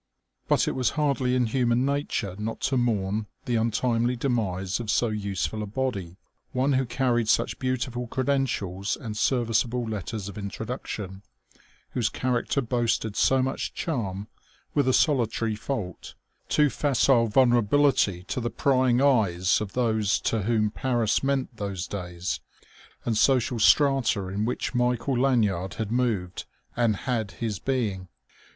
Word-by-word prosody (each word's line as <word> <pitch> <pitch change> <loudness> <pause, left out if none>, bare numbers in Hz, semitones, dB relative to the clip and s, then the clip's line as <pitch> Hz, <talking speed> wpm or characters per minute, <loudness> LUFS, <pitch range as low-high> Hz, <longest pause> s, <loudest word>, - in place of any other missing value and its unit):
But - - +2
it - - +1
was 130 -2 +1
hardly 135 -4 +1
in 125 -1 +2
human 120 +1 +1
nature 140 -9 -1
not 110 +2 -4
to 135 0 0
mourn 105 -4 0 0.2
the 125 -3 0
untimely 115 +2 +1
demise 100 -7 -1
of 115 -3 -5
so 120 +2 +2
useful 105 0 -2
a 105 - -4
body, 100 -7 -3 0.4
one 135 +2 +2
who 130 -1 +1
carried 120 -2 +1
such - - +1
beautiful 125 -1 -2
credentials 120 -8 -1
and 115 -7 -6
serviceable 120 +1 +1
letters 105 -1 -4
of 100 +1 -7
introduction, 100 -2 -5 0.7
whose 120 -4 0
character 130 +2 0
boasted 115 -3 0
so 130 -1 +3
much 130 +1 -3
charm 105 - -3 0.5
with 140 -3 +2
a 130 - +3
solitary 115 -6 +2
fault 105 -5 -5 0.3
too 150 -2 +3
facile 135 -4 +3
vulnerability 120 -4 +3
to 125 - -3
the 120 - -1
prying 130 -1 +2
eyes 95 -10 +3
of 105 -2 -5
those 110 -5 +1
to 110 - 0
whom 105 0 +1
Paris 120 -3 0
meant 135 -3 -1
those 100 -3 -3
days 90 -2 -4 0.7
and 115 - 0
social 125 -3 +3
strata 120 -6 +3
in 100 +3 -1
which 125 - -2
Michael 125 +1 +1
Lanyard 105 -9 +1
had 110 -2 -3
moved 110 -8 -1 0.3
and 115 -3 +2
had 115 -6 -1
his 110 -4 -3
being. 110 -7 -2
115 Hz, 140 wpm, -26 LUFS, 105-130 Hz, 0.7 s, so